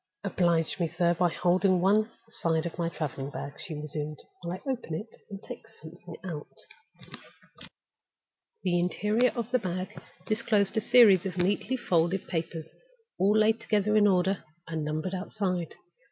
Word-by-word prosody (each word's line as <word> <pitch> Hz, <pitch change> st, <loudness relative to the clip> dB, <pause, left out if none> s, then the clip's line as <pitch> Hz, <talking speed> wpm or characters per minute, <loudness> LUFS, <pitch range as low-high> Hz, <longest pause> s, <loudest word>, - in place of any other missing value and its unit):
"Oblige 170 Hz, -4 st, +1 dB
me, 170 Hz, -, +2 dB
sir, 170 Hz, +2 st, +2 dB
by 175 Hz, +1 st, +2 dB
holding 185 Hz, +2 st, +2 dB
one 210 Hz, +4 st, +3 dB, 0.2 s
side 165 Hz, -7 st, 0 dB
of 170 Hz, 0 st, -5 dB
my 165 Hz, -1 st, +1 dB
traveling 140 Hz, -4 st, -4 dB
bag," 140 Hz, 0 st, -6 dB
she 165 Hz, -5 st, -5 dB
resumed, 150 Hz, 0 st, -5 dB, 0.2 s
"while 175 Hz, +1 st, -4 dB
I 270 Hz, -, -3 dB
open 235 Hz, -11 st, -4 dB
it 215 Hz, +7 st, -7 dB
and 200 Hz, -1 st, -7 dB
take -, -, -9 dB
something 175 Hz, -4 st, -12 dB
out." 160 Hz, -5 st, -7 dB, 2.1 s
The 175 Hz, -1 st, +2 dB
interior 210 Hz, +7 st, +2 dB
of 235 Hz, -1 st, -3 dB
the 255 Hz, -, +3 dB
bag 185 Hz, -2 st, -4 dB, 0.2 s
disclosed 210 Hz, -2 st, +1 dB
a 220 Hz, -, +2 dB
series 205 Hz, -6 st, +6 dB
of 180 Hz, -1 st, -6 dB
neatly 200 Hz, +7 st, +1 dB
folded 175 Hz, -3 st, +1 dB
papers, 165 Hz, -2 st, -4 dB, 0.5 s
all 205 Hz, +3 st, +4 dB
laid 220 Hz, +1 st, +4 dB
together 210 Hz, 0 st, +1 dB
in 210 Hz, -1 st, +6 dB
order, 190 Hz, 0 st, +2 dB, 0.2 s
and 160 Hz, -2 st, -3 dB
numbered 155 Hz, +4 st, -2 dB
outside. 185 Hz, -2 st, -2 dB
180 Hz, 155 wpm, -29 LUFS, 165-210 Hz, 2.1 s, series